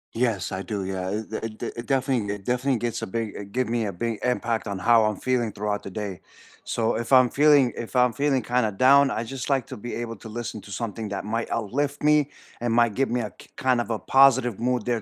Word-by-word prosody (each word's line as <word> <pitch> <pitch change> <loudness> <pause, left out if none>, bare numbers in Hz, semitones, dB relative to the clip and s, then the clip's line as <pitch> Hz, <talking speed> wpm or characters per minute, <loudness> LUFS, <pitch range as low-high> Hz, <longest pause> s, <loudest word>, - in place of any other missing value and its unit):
Yes, 115 -6 0
I 95 0 -3
do, 100 -1 -4
yeah, 95 -1 -3
it 110 +2 -4
it 110 -1 -5
it 120 - -6
definitely 130 -7 0
it 100 - -13
definitely 125 +1 +1
gets 120 -1 -3
a - - -4
big 105 -2 -5
give 125 0 0
me 115 -1 0
a 100 - -2
big 115 +4 -3
impact 120 -2 -1
on 100 -1 -3
how 115 +3 +4
I'm 105 -1 0
feeling 120 -1 0
throughout 105 0 -2
the - - -8
day, 100 -2 -5 0.4
so 115 -1 0
if 120 +3 -5
I'm 130 -2 +7
feeling 145 -4 +5
if 120 +2 -7
I'm 125 -2 +4
feeling 140 -3 +1
kind 120 0 +1
of 100 -2 -6
down, 140 +1 +6
I 115 - -2
just 130 +4 -6
like 135 -3 +1
to - - -7
be 120 +3 -6
able 115 -1 -4
to 110 - -11
listen 110 -2 -5
to 100 - -13
something 110 -1 -4
that 100 0 -4
might 115 +2 -2
uplift 140 +7 -2
me 150 -1 +4 0.3
and 120 -1 0
might 120 -2 +3
give 135 +2 0
me 120 0 0
a 105 - -5
k - - -16
kind 125 -2 +2
of - - -6
a 115 - 0
positive 130 -5 +4
mood 125 -2 0
there 120 -3 0
115 Hz, 245 wpm, -25 LUFS, 105-125 Hz, 0.4 s, I'm